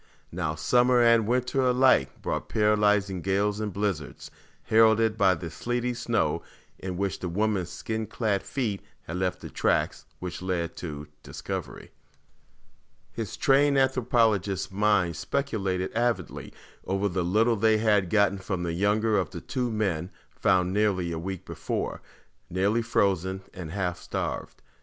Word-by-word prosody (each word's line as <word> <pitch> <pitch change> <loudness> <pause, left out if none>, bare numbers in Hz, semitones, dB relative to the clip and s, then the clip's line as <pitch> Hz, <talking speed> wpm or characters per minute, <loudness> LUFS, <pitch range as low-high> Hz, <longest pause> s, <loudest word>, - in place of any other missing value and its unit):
Now, 80 -3 -2
summer 125 +8 +3
and 115 -2 +5
winter 125 +2 +1
alike 125 - +3
brought - - -3
paralyzing 105 -3 +2
gales 100 +3 0
and 105 -1 -2
blizzards, 95 -6 -3 0.3
heralded 110 0 +4
by 95 -4 +4
the 85 -1 -7
sleety 120 +7 -2
snow 120 - 0 0.4
in 90 -1 -5
which 100 0 -2
the 90 - -3
woman's 100 -1 0
skin 110 -1 -4
clad 105 -5 -1
feet 110 -8 -3 0.2
had 85 - -5
left 90 0 -1
the - - -7
tracks - - 0
which 90 -1 -6
led 90 -2 -2
to 75 -4 -6 0.2
discovery. - - -6 1.2
His 110 -4 -5
trained 140 +1 +4
anthropologist's 115 -8 +2
mind 100 -5 +2
speculated 95 -9 -2
avidly 115 -5 -1 0.3
over 95 +1 0
the 90 -2 -1
little 110 +7 +3
they 110 +1 +3
had 105 -4 +2
gotten 100 -1 +3
from 95 -2 -3
the 85 -1 -2
younger 105 +3 +2
of 90 - -2
the - - -7
two 125 -2 -2
men 95 -6 -1 0.2
found 90 0 +2
nearly 100 -4 +1
a 80 - -3
week 95 +1 -5
before, - - -4 0.5
nearly 100 +6 +1
frozen 95 -4 0
and 90 -4 -7
half 90 0 -2
starved. - - -5
100 Hz, 145 wpm, -27 LUFS, 90-115 Hz, 1.2 s, and